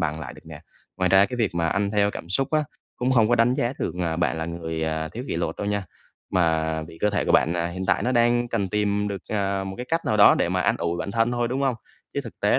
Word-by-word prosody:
bằng 80 Hz, -1 st, -1 dB
lại -, -, -7 dB
được -, -, -16 dB
nè. -, -, -10 dB, 0.4 s
Ngoài 90 Hz, 0 st, +1 dB
ra 95 Hz, +1 st, +6 dB
cái 125 Hz, 0 st, -5 dB
việc 110 Hz, -7 st, 0 dB
mà 85 Hz, -1 st, +1 dB
ăn 100 Hz, +4 st, 0 dB
theo 105 Hz, -1 st, +2 dB
cảm 85 Hz, -, -8 dB
xúc 135 Hz, +8 st, 0 dB
á, 155 Hz, -1 st, +2 dB, 0.3 s
cũng 125 Hz, +1 st, 0 dB
hông 115 Hz, -4 st, +4 dB
có 120 Hz, -, +4 dB
đánh 120 Hz, +2 st, +3 dB
giá 120 Hz, +1 st, 0 dB
được, -, -, -2 dB
à, 80 Hz, -2 st, -1 dB
bạn 85 Hz, -2 st, 0 dB
là 80 Hz, -, -2 dB
người, 80 Hz, -1 st, -4 dB
à, 80 Hz, 0 st, -2 dB
thiếu 120 Hz, +9 st, -7 dB
kỷ -, -, -3 dB
luật 85 Hz, -, -2 dB
đâu 100 Hz, -, -4 dB
nha, 100 Hz, -1 st, -1 dB, 0.5 s
mà 80 Hz, -3 st, +1 dB
vì 80 Hz, +1 st, -11 dB
cơ 105 Hz, -, +2 dB
thể 100 Hz, -, 0 dB
của -, -, +1 dB
bạn, 80 Hz, -, +4 dB
à, 85 Hz, -1 st, -1 dB
hiện 95 Hz, +2 st, -5 dB
tại -, -, +2 dB
nó 125 Hz, -, 0 dB
đang 120 Hz, 0 st, +3 dB
cần 100 Hz, -3 st, -1 dB
tìm 105 Hz, 0 st, 0 dB
được, 100 Hz, -2 st, -5 dB
à, 100 Hz, -2 st, -1 dB
một 95 Hz, 0 st, -5 dB
cái 125 Hz, -, -6 dB
cách 165 Hz, +1 st, +1 dB
nào 110 Hz, -, +2 dB
đó 100 Hz, -, +8 dB
để -, -, +1 dB
mà -, -, 0 dB
an -, -, +2 dB
ủi 85 Hz, 0 st, -2 dB
bản 100 Hz, -, -3 dB
thân 115 Hz, +2 st, +1 dB
thôi, 120 Hz, -1 st, 0 dB
đúng 130 Hz, +2 st, -2 dB
hông? 135 Hz, -3 st, +2 dB, 0.4 s
Chứ -, -, 0 dB
thực -, -, -11 dB
tế -, -, +3 dB
100 Hz, 295 wpm, -24 LUFS, 85-120 Hz, 0.5 s, đó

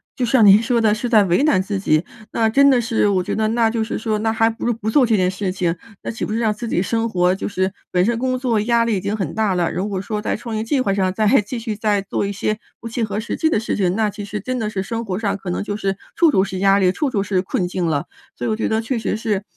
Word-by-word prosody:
就 250 Hz, -, 0 dB
像 235 Hz, -2 st, +4 dB
您 200 Hz, +1 st, +8 dB
说 235 Hz, 0 st, +1 dB
的 215 Hz, -2 st, +3 dB
是 235 Hz, +3 st, -2 dB
在 220 Hz, -3 st, +5 dB
为 185 Hz, +7 st, +2 dB
难 210 Hz, -12 st, +3 dB
自 195 Hz, +1 st, -3 dB
己， 155 Hz, -4 st, +2 dB, 0.3 s
那 225 Hz, -1 st, +2 dB
真 280 Hz, +4 st, +5 dB
的 260 Hz, -3 st, +4 dB
是 225 Hz, -2 st, +1 dB
我 185 Hz, -2 st, +1 dB
觉 -, -, -3 dB
得 220 Hz, 0 st, +1 dB
那 230 Hz, 0 st, +2 dB
就 225 Hz, 0 st, -1 dB
是 225 Hz, -, -3 dB
说， 215 Hz, -1 st, -1 dB
那 220 Hz, +1 st, 0 dB
还 225 Hz, 0 st, +3 dB
不 225 Hz, -, -6 dB
如 240 Hz, -, +2 dB
不 220 Hz, -1 st, -4 dB
做 260 Hz, +3 st, +4 dB
这 225 Hz, -2 st, +2 dB
件 185 Hz, -2 st, +2 dB
事 190 Hz, 0 st, -3 dB
情。 175 Hz, -2 st, -1 dB, 0.3 s
那 -, -, -3 dB
岂 225 Hz, -, -4 dB
不 210 Hz, -, -4 dB
是 225 Hz, -, 0 dB
让 220 Hz, -2 st, +1 dB
自 235 Hz, +3 st, -6 dB
己 180 Hz, -, 0 dB
生 225 Hz, +4 st, 0 dB
活 180 Hz, -2 st, +2 dB
就 -, -, -4 dB
是 190 Hz, -1 st, -1 dB, 0.2 s
本 180 Hz, 0 st, +2 dB
身 230 Hz, +4 st, +1 dB
工 255 Hz, 0 st, 0 dB
作 240 Hz, -4 st, +1 dB
压 235 Hz, +2 st, +2 dB
力 225 Hz, -3 st, +1 dB
已 -, -, -1 dB
经 200 Hz, +2 st, -2 dB
很 200 Hz, -4 st, -3 dB
大 215 Hz, -3 st, +1 dB
了， 175 Hz, -2 st, 0 dB
如 190 Hz, +4 st, -2 dB
果 195 Hz, -2 st, -3 dB
说 210 Hz, +1 st, -4 dB
在 -, -, -1 dB
创 230 Hz, 0 st, -6 dB
业 215 Hz, -, -1 dB
计 260 Hz, +4 st, 0 dB
划 200 Hz, -5 st, 0 dB
上 190 Hz, -2 st, 0 dB
再 215 Hz, +2 st, 0 dB, 0.2 s
继 210 Hz, +5 st, -6 dB
续 225 Hz, -2 st, -4 dB
再 210 Hz, -2 st, +1 dB
做 200 Hz, +1 st, -2 dB
一 200 Hz, -, -2 dB
些 215 Hz, +2 st, -1 dB, 0.2 s
不 230 Hz, -, -6 dB
切 230 Hz, +1 st, -2 dB
合 205 Hz, -1 st, -2 dB
实 225 Hz, -, -4 dB
际 320 Hz, -, +2 dB
的 220 Hz, -, +1 dB
事 225 Hz, -, -2 dB
情， 185 Hz, -3 st, +1 dB
那 220 Hz, -1 st, +1 dB
其 205 Hz, 0 st, -7 dB
实 210 Hz, +1 st, -5 dB
真 255 Hz, +5 st, -3 dB
的 215 Hz, -2 st, -2 dB
是 200 Hz, -3 st, -3 dB
生 230 Hz, +3 st, -4 dB
活 185 Hz, -3 st, -3 dB
上 200 Hz, -3 st, -1 dB
可 190 Hz, -2 st, -7 dB
能 180 Hz, -, -2 dB
就 205 Hz, 0 st, -4 dB
是 195 Hz, -2 st, -2 dB, 0.2 s
处 335 Hz, -1 st, +5 dB
处 190 Hz, -, +3 dB
是 190 Hz, -1 st, -4 dB
压 195 Hz, +1 st, +4 dB
力、 185 Hz, -2 st, +3 dB
处 290 Hz, +8 st, -1 dB
处 215 Hz, -6 st, 0 dB
是 190 Hz, -2 st, 0 dB
困 185 Hz, -1 st, -2 dB
境 180 Hz, 0 st, -2 dB
了。 150 Hz, -4 st, 0 dB, 0.3 s
所 -, -, -5 dB
以 -, -, 0 dB
我 215 Hz, -, +1 dB
觉 225 Hz, -, -1 dB
得 220 Hz, 0 st, 0 dB
确 245 Hz, +2 st, -2 dB
实 -, -, -1 dB
是， 215 Hz, -3 st, -2 dB
215 Hz, 335 characters per minute, -20 LUFS, 195-230 Hz, 0.3 s, 您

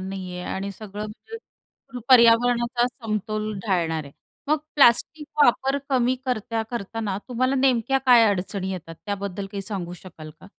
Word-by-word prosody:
नाहीये 185 Hz, -1 st, -6 dB
आणि 195 Hz, +1 st, -4 dB
सगळं 210 Hz, +1 st, -7 dB
म्हणजे 345 Hz, -, -13 dB
पर्यावरणाचा 240 Hz, 0 st, +5 dB
समतोल 215 Hz, -3 st, -3 dB
ढाळणार 165 Hz, -5 st, 0 dB
आहे. 140 Hz, -, -13 dB, 0.4 s
मग 305 Hz, 0 st, +3 dB, 0.2 s
प्लास्टिक 290 Hz, +3 st, +3 dB, 0.2 s
वापर 270 Hz, +2 st, +3 dB
कमी 255 Hz, -1 st, +2 dB
करता 225 Hz, -2 st, -1 dB
करताना 215 Hz, -3 st, -3 dB
तुम्हाला 255 Hz, +2 st, 0 dB
नेमक्या 265 Hz, 0 st, +2 dB
काय 240 Hz, -2 st, +7 dB
अडचणी 190 Hz, 0 st, -2 dB
येतात? 165 Hz, -2 st, -7 dB
त्याबद्दल 200 Hz, -1 st, -4 dB
काही 200 Hz, -1 st, -4 dB
सांगू 190 Hz, -4 st, -5 dB
शकाल 160 Hz, -4 st, -11 dB
का? -, -, -13 dB
215 Hz, 135 wpm, -24 LUFS, 190-245 Hz, 0.4 s, काय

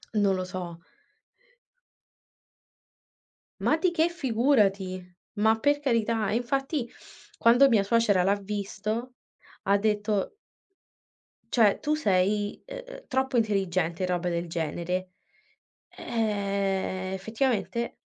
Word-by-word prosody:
Non 200 Hz, -2 st, +3 dB
lo 185 Hz, 0 st, -3 dB
so. 180 Hz, -2 st, -6 dB, 2.8 s
Ma 310 Hz, -, +2 dB
di 345 Hz, +2 st, +1 dB
che 335 Hz, 0 st, +2 dB
figurati. 210 Hz, -, +1 dB, 0.2 s
Ma 220 Hz, +1 st, +3 dB
per 290 Hz, +3 st, +2 dB
carità, 230 Hz, -5 st, 0 dB
e -, -, 0 dB
infatti 270 Hz, +2 st, -1 dB, 0.5 s
quando 245 Hz, +4 st, +6 dB
mia 225 Hz, -6 st, +4 dB
suocera 205 Hz, -2 st, +3 dB
l'ha 195 Hz, +2 st, +3 dB
visto 210 Hz, +4 st, -4 dB, 0.5 s
ha 200 Hz, +1 st, +3 dB
detto 210 Hz, -, 0 dB, 1.2 s
"Cioè, 215 Hz, -5 st, +4 dB
tu 300 Hz, -, 0 dB
sei, 205 Hz, -6 st, +1 dB
ehm, -, -, -9 dB
troppo 265 Hz, -1 st, 0 dB
intelligente." 185 Hz, -6 st, 0 dB
E -, -, +3 dB
roba 180 Hz, 0 st, -1 dB
del 170 Hz, 0 st, -2 dB
genere. 175 Hz, +3 st, -3 dB, 0.8 s
Ehm, 195 Hz, -4 st, -2 dB
effettivamente 225 Hz, +3 st, -1 dB
210 Hz, 105 wpm, -27 LUFS, 190-245 Hz, 2.8 s, quando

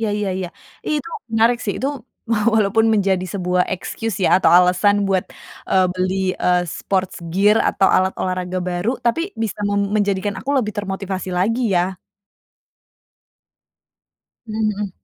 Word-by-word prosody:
iya 220 Hz, -2 st, 0 dB
iya 210 Hz, -1 st, -2 dB
iya. 185 Hz, -2 st, -3 dB, 0.4 s
Itu 300 Hz, +1 st, -2 dB, 0.2 s
menarik 230 Hz, +2 st, +3 dB
sih, 200 Hz, -, -1 dB
itu 270 Hz, -, 0 dB, 0.7 s
walaupun 220 Hz, +1 st, +3 dB
menjadi 195 Hz, -3 st, +1 dB
sebuah 180 Hz, -1 st, +1 dB
excuse 205 Hz, +3 st, -4 dB
ya, -, -, +5 dB
atau -, -, +3 dB
alasan 190 Hz, +3 st, +3 dB
buat, 190 Hz, -2 st, +1 dB, 0.4 s
eee, 185 Hz, -1 st, +4 dB
beli, 185 Hz, +1 st, -1 dB, 0.2 s
eee, 180 Hz, 0 st, +2 dB
sports 185 Hz, +2 st, -2 dB, 0.2 s
gear 205 Hz, +4 st, +4 dB
atau 195 Hz, -, +2 dB
alat 190 Hz, 0 st, +2 dB
olahraga 185 Hz, 0 st, -2 dB
baru, 180 Hz, +4 st, -1 dB
tapi 235 Hz, +7 st, +2 dB, 0.2 s
bisa 215 Hz, -2 st, -3 dB
mem 200 Hz, 0 st, 0 dB
menjadikan 200 Hz, -1 st, 0 dB
aku 275 Hz, -, -4 dB
lebih 215 Hz, -5 st, 0 dB
termotivasi 195 Hz, -2 st, -4 dB
lagi, 220 Hz, +3 st, +1 dB
ya? 180 Hz, +2 st, 0 dB, 2.5 s
Mmm, 215 Hz, -1 st, -1 dB
hmm. 205 Hz, -2 st, -3 dB
195 Hz, 140 wpm, -20 LUFS, 185-215 Hz, 2.5 s, ya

